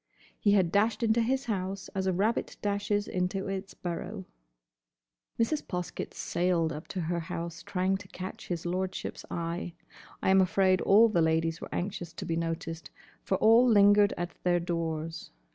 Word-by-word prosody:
he 205 - +3
had 185 -4 +3
dashed 215 +4 +2
into 225 +1 +3
his 260 +4 0
house 195 -3 -3
as 190 -1 -2
a - - +3
rabbit 205 +6 0
dashes 205 0 0
into 185 +2 -2
its 195 0 -5
burrow. 185 +3 -5 1.1
Mrs. 290 +7 +1
Poskett 180 -1 -4
sailed 170 -2 0
up 150 +3 -8
to 185 - -4
her 170 +1 -1
house 170 0 -5
trying 185 +2 0
to - - -12
catch 185 +4 -8
his 175 -2 -3
lordship's 185 +2 -3
eye. 170 +1 -3 0.5
I - - +4
am 190 0 +6
afraid 185 0 +3
all 215 +4 +6
the 205 -6 +2
ladies 165 +1 +1
were - - -7
anxious 175 -3 -4
to - - -6
be 165 - -1
noticed, 165 0 -4 0.3
for 190 - 0
all 230 +5 +6
lingered 205 -1 +6
at 175 -1 -3
their 175 -1 +3
doors. 165 -2 -3
185 Hz, 165 wpm, -29 LUFS, 170-205 Hz, 1.1 s, am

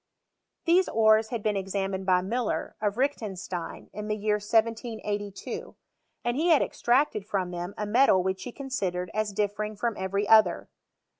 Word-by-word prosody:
These 360 +2 +4
ores 220 0 +4
had 230 -3 -4
been 215 -1 +1
examined 195 0 -2
by 180 -1 +4
Muller, 235 +4 -2
of 205 0 0
Reichenstein, 200 -10 -3
in 210 0 -5
the 210 - 0
year 210 0 +1
1782; 220 -2 -2 0.5
and 240 0 +1
he 315 +5 +1
had 320 -5 +5
ex - - -8
tracted 240 -3 +2
from 190 -3 -2
them 175 +2 -5
a 210 - -2
metal 210 -3 +4
which 190 0 -2
he 245 - -6
considered 190 -11 -3
as 215 -1 -1
differing 210 +1 -2
from 230 +1 -1
every 200 +2 -1
other. 215 -6 +4
210 Hz, 160 wpm, -27 LUFS, 195-230 Hz, 0.5 s, had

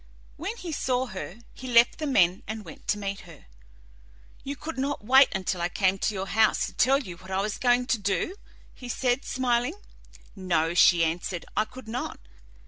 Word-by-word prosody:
When 390 +10 -5
he 360 -6 -6
saw 255 -3 0
her 190 -3 -7 0.2
he 255 - -9
left 240 -1 +4
the 305 - -2
men 185 -9 +3
and 215 0 -5
went 160 - -12
to 210 - +1
meet 200 -1 -4
her. 165 -5 -14 1.0
"You 280 +1 -4
could 305 +1 -6
not 275 -5 -2
wait 265 +3 +7
until 185 -2 -2
I 175 - 0
came 190 +1 +1
to 215 - -1
your 190 0 -3
house 220 +2 +2
to - - -8
tell 270 +2 +4
you 185 -12 -7
what 185 +1 -14
I 190 0 0
was 205 +1 -2
going 245 0 +3
to 235 -2 0
do?" 200 - -1 0.4
he 250 - -10
said, 250 +1 0
smiling. 250 +3 0 0.6
"No," 170 -4 0
she 175 -1 +6
answered, 170 +1 -2
"I 215 - +2
could 255 0 -12
not. 240 +3 -4
220 Hz, 195 wpm, -27 LUFS, 185-260 Hz, 1.0 s, wait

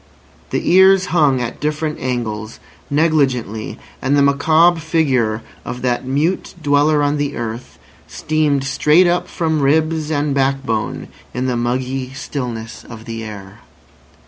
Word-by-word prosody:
The - - -2
ears 190 +1 +6
hung 145 -6 +3
at 120 -1 -4
different 150 +1 -2
angles, 110 -4 -4 0.3
negligently; 135 -8 0 0.2
and 140 +2 +2
the 140 - +4
macabre 160 +5 +4
figure 130 -9 0 0.2
of 125 +1 -6
that 125 0 -1
mute 150 +10 -1
dweller 145 0 +2
on 145 +1 +1
the 145 0 -2
earth 115 +1 -6 0.3
steamed 155 -3 0
straight 150 +5 +3
up 175 0 +1
from 160 -3 -1
ribs 155 +2 +1
and 145 -2 0
backbone 135 -5 -1 0.3
in 125 +1 -1
the 125 -1 0
muggy 130 +2 -2
stillness 120 -5 -5
of 115 -1 -11
the 115 0 -6
air. 100 -3 -9
140 Hz, 135 wpm, -18 LUFS, 120-155 Hz, 0.3 s, ears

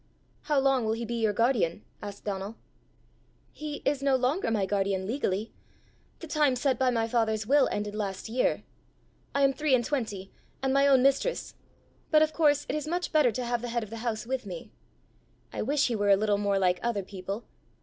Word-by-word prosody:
"How 295 -2 +2
long 270 -2 +2
will 220 0 +1
he 230 +1 -3
be 235 - -4
your 220 -2 +3
guardian?" 210 -5 +1 0.2
asked 205 -1 -8
Donal. 200 +1 -4 1.0
"He 300 -1 -6
is 280 -1 +1
no 275 -1 +3
longer 260 +6 +1
my 210 -3 +1
guardian 195 -1 0
legally. 215 -3 -2 0.7
The - - -6
time 300 -4 +2
set 255 0 0
by 260 -1 +3
my 230 -2 +1
father's 220 -2 0
will 280 +3 +4
ended 205 0 -3
last 200 -2 -4
year. 245 +3 0 0.7
I 280 - +3
am 275 0 +4
three 295 -1 +2
and 240 -2 0
twenty, 215 -9 -3 0.3
and 265 0 +1
my 275 +1 +4
own 265 -2 +5
mistress. 275 - +1 0.6
But 310 -1 +6
of 310 0 0
course 295 -3 +3
it - - -2
is 305 0 -3
much 350 +2 -2
better 300 -6 +4
to 245 +3 -3
have 240 0 -1
the 245 - -4
head 235 0 -1
of 215 - -10
the 230 - -5
house 225 -1 -3
with 255 -3 -3
me. 175 -3 -8 0.8
I - - -3
wish 285 +5 +2
he 240 - -1
were 205 -1 +1
a 200 - +7
little 205 0 +1
more 200 -1 +1
like 180 -2 +2
other 230 -4 -1
people! 195 +3 -6
235 Hz, 205 wpm, -28 LUFS, 205-275 Hz, 1.0 s, a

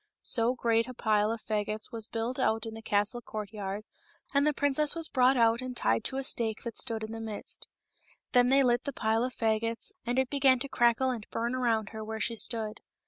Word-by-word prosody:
So 235 0 +3
a - - -11
great 230 -1 +1
pile 215 -1 +2
of 230 -1 -4
fagots 215 +1 -1
was 225 -2 -4
built 235 +3 -3
out 225 -3 +1
in 225 - -6
the 225 - -8
castle 210 +3 0
courtyard, 210 -2 -5 0.5
and 285 +1 +3
the - - +4
princess 285 +1 +2
was 330 -1 0
brought 255 0 +3
out 230 0 +3
and 255 -1 -5
tied 115 +1 +1
to 265 - -1
a 270 - -2
stake 225 -4 0
that 235 -2 -5
stood 225 -3 0
in 220 - -5
the 225 0 -6
midst. 220 -2 -5 0.6
Then 245 -1 +4
they 275 +1 +5
lit 245 -1 +2
the 280 - -3
pile 225 -1 +1
of 255 0 -3
fagots, 225 +1 0
and 245 +2 -2
it 265 -1 +1
began 270 -2 +4
to 245 - -4
crackle 240 0 +2
and 225 -4 -6
bum 235 +2 -2
around 225 -4 0
her 220 -1 -7
where 220 0 -5
she 230 +2 -1
stood. 220 0 0
230 Hz, 220 wpm, -29 LUFS, 220-255 Hz, 0.6 s, they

